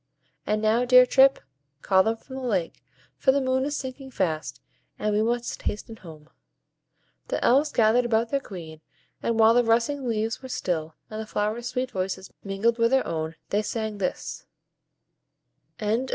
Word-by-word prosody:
And 215 +1 0
now, 220 +3 +3
dear 250 0 +7
Trip, 265 +1 +5 0.5
call 190 -1 +4
them 225 +3 0
from 260 +3 -10
the - - -5
lake, 200 -9 -2 0.4
for 265 - +4
the 280 - +2
moon 260 0 +1
is 290 0 -2
sinking 265 0 -7
fast, 165 -10 -2 0.4
and 210 0 -1
we 210 - +2
must 235 +2 -1
hasten 220 +2 -4
home." 155 -5 -13 1.0
The - - -1
Elves 280 +5 +4
gathered 230 +2 +3
about 230 0 +1
their 280 - +2
Queen, 165 - -10 0.4
and 230 - 0
while 220 +1 +7
the 245 +1 +4
rustling 240 +4 +1
leaves 225 0 -1
were 260 - -9
still, 160 -8 -2 0.2
and 215 0 -4
the 220 - -7
flowers' 215 +4 -2
sweet 255 +1 -2
voices 190 -2 -4
mingled 210 +4 0
with 230 0 +4
their 265 +1 +2
own, 160 0 -3 0.2
they 205 - +2
sang 215 -1 -4
this 185 - -4 1.3
FAIRY 215 +1 0
SONG. 260 +2 -3
225 Hz, 175 wpm, -25 LUFS, 200-250 Hz, 1.3 s, dear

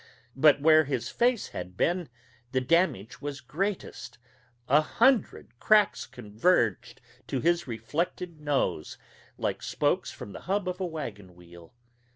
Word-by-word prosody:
But 145 +1 +5
where 155 +1 +5
his 130 -4 -2
face 240 -2 +1
had 90 +1 -7
been 175 -1 0 0.4
the 130 - +3
damage 130 - 0
was 145 -1 -5
greatest 150 - -4 0.5
a 145 +3 +5
hundred 220 - +1
cracks 210 -2 +3
converged 115 - 0 0.3
to 135 - -2
his 170 +3 +1
reflected 150 +8 -3
nose, 135 - -1 0.4
like - - -2
spokes - - 0
from 100 - -9
the - - -8
hub 200 -1 0
of 180 0 -3
a 185 - -1
wagon 105 - -7
wheel. 85 +2 -16
145 Hz, 135 wpm, -28 LUFS, 115-180 Hz, 0.5 s, But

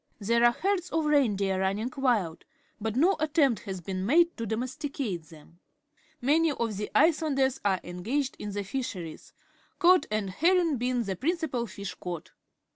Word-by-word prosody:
There 235 +3 +1
are 240 - +7
herds 370 +3 -1
of 320 -1 0
reindeer 205 -10 +2
run 190 +1 +1
ning 225 +5 -4
Mild, 230 -12 0 0.4
but 220 0 -3
no 345 +9 +4
attempt 295 - +2
has 190 -3 -5
been 185 +2 -4
made 335 - +4
to 230 -1 -3
domesticate 250 - -3
them. 160 +1 -17 0.6
Many 310 +5 +3
of 230 -5 -2
the 210 - -3
Icelanders 285 -5 +3
are 195 -2 +2
engaged 230 +11 -2
in 210 - -5
the 205 0 -2
fi 230 +8 -3
^heries, 180 -10 -6 0.5
cod 365 0 +5
and 210 -2 -1
herring 335 - +2
being 245 0 0
the 195 -3 -3
principal 285 - -1
fish 200 0 -6
caught. 175 -3 -7
240 Hz, 165 wpm, -28 LUFS, 195-300 Hz, 0.6 s, are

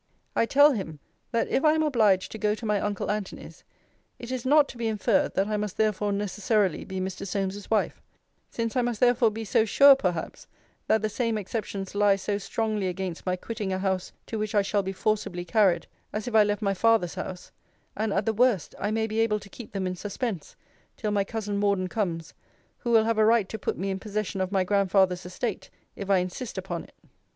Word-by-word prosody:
'I 230 - +2
tell 285 +4 +6
him, 190 - -4 0.3
that 230 - +1
if 270 - +1
I 305 -1 +5
am 315 0 +2
obliged 215 -10 +2
to 220 - -7
go 210 0 +1
to 225 - -8
my 210 -2 +1
uncle 205 -1 -2
Antony's, 210 -2 -6 0.5
it 240 +1 -8
is 255 -1 -3
not 295 +1 +5
to - - -10
be 230 - -1
inferred, 215 -2 +1
that 195 - +2
I 210 0 -1
must 210 -2 -4
therefore 210 -1 +1
necessarily 205 -1 0
be 190 -1 -5
Mr. 185 0 -4
Solmes's 195 +1 -3
wife: 220 - 0 0.5
since 230 0 -3
I 250 - +3
must 240 -3 -2
therefore 245 -2 +4
so 220 - +3
sure 275 +6 +7
perhaps 180 -10 -3 0.4
that 220 -1 +2
the - - +2
same 230 0 -1
exceptions 200 -2 -4
lie 205 -1 +4
so 200 +1 -2
strongly 215 -1 -1
against 180 -1 -4
my 180 - +2
quitting 210 +1 -4
a 185 - 0
house 190 -1 -1
to 220 - -4
which 215 0 -2
I 205 - +4
shall 200 +1 +1
be 190 0 -4
forcibly 195 -3 -1
carried, 180 -2 +3 0.3
as 210 +2 -4
if 245 - -4
I 220 -1 +7
left 205 +1 -1
my 195 -1 +2
father's 220 -3 +2
house: 180 -1 -7 0.4
and, 215 0 -1
at 200 +1 0
the 225 - +1
worst, 230 -6 +2
I 205 - -1
may 220 +1 0
be 220 0 -2
able 220 -2 +2
to 200 - -13
keep 230 +2 -10
them 195 -2 -2
in 185 0 -2
suspense 205 - -4 0.4
till 215 -3 -2
my 200 -1 +2
cousin 210 0 -3
Morden 200 -2 +1
comes, 170 -6 -3 0.5
who 240 - -4
will 225 -2 +5
have 225 -1 +1
a - - +6
right 225 -3 +4
to 220 - -5
put - - -2
me 195 +1 -2
in 190 - -3
possession 210 -2 -3
of 185 0 -2
my 190 -2 +2
grandfather's 190 -2 +2
estate, 200 +3 -4 0.3
if 200 -1 -7
I 195 - +5
insist 185 +6 -4
upon 180 -3 -4
it.' - - -21
205 Hz, 215 wpm, -27 LUFS, 190-225 Hz, 0.5 s, sure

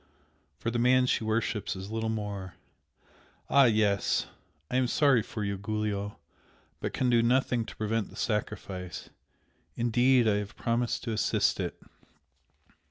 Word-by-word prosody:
(for 115 +7 -2
the 120 - -1
man 125 +1 +4
she 125 - +1
worships 110 -1 -1
is 95 +2 -7
little 110 0 -1
more!) 100 -4 -4 1.0
ah, 140 -1 +7
yes! 105 -3 +2 0.5
I 125 - +1
am 130 -1 +2
sorry 140 -2 +4
for 105 0 -5
you, 100 -1 -2
Giulio! 105 -1 -3 0.6
but - - -3
can 125 -1 +1
do 120 -1 +5
nothing 120 -1 +2
to - - -10
prevent 110 -1 -1
the - - -14
sacrifice, 95 -4 -4 0.6
indeed, 120 +1 +3
I 105 -1 +3
have 105 0 -5
promised 120 +1 -1
to 120 - -3
assist 105 -4 +1
it!" - - -3
110 Hz, 145 wpm, -29 LUFS, 105-120 Hz, 1.0 s, ah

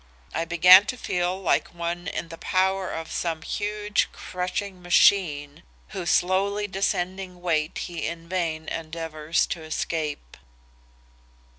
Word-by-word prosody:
I 165 - -1
began 180 +4 +8
to 255 - -3
feel 180 -3 -1
like 180 -1 0
one 170 +1 -3
in 165 - -4
the 165 - -9
power 190 0 +1
of 165 0 -5
some 165 -2 -2
huge 210 0 -1
crushing 185 +1 -4
machine 170 -4 +3 0.3
whose 185 -4 -4
slowly 200 +3 +2
descending 190 -2 -2
weight 160 -3 0
he 170 -2 -4
in 165 0 -6
vain 165 -3 -2
endeavors 160 -1 -2
to 170 - -4
escape. 155 - -4
175 Hz, 125 wpm, -25 LUFS, 165-190 Hz, 0.3 s, began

